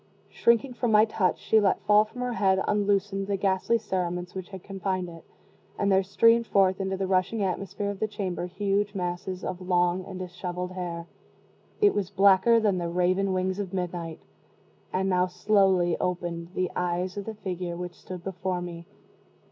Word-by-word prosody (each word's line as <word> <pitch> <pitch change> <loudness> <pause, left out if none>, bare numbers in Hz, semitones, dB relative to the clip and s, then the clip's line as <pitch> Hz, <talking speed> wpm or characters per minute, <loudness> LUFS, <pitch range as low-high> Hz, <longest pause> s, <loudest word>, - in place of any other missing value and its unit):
Shrinking 235 +2 +2
from 240 -1 -1
my 215 0 +6
touch, 205 -4 0
she 220 - +3
let 200 -2 +2
fall 210 +1 +5
from 235 +3 -9
her 250 -1 -1
head, 190 -4 +2
unloosened, 200 -1 +1
the 200 -1 0
ghastly 195 +4 +1
cerements 180 -4 -3
which 185 -2 -6
had 190 -2 -9
confined 190 -2 -3
it, 165 -1 -12 0.5
and 200 0 +1
there 190 0 +5
streamed 230 +4 +3
forth 190 -1 +3
into 190 0 -2
the 190 - -1
rushing 190 +3 +1
atmosphere 195 +2 -2
of 200 - -8
the 220 - 0
chamber 190 -4 -3
huge 200 +2 -1
masses 180 0 -3
of 185 0 -4
long 180 0 +1
and 190 -2 -7
disheveled 180 0 -5
hair; 175 -2 -5 0.8
it 410 -1 +5
was 195 -3 -1
blacker 200 +3 +5
than 205 -4 +1
the 170 -1 -2
raven 185 +3 +1
wings 185 +1 -1
of 195 -2 -4
midnight. 175 -3 -4 0.7
And 190 +1 0
now 180 -1 +2
slowly 185 -2 +3
opened 175 -1 -3
the 185 -1 0
eyes 180 +1 -1
of 200 -1 -5
the 220 - -5
figure 180 -4 -4
which 175 0 -5
stood 180 -2 -8
before 185 -1 -3
me. 170 -1 -7
190 Hz, 180 wpm, -27 LUFS, 180-200 Hz, 0.8 s, my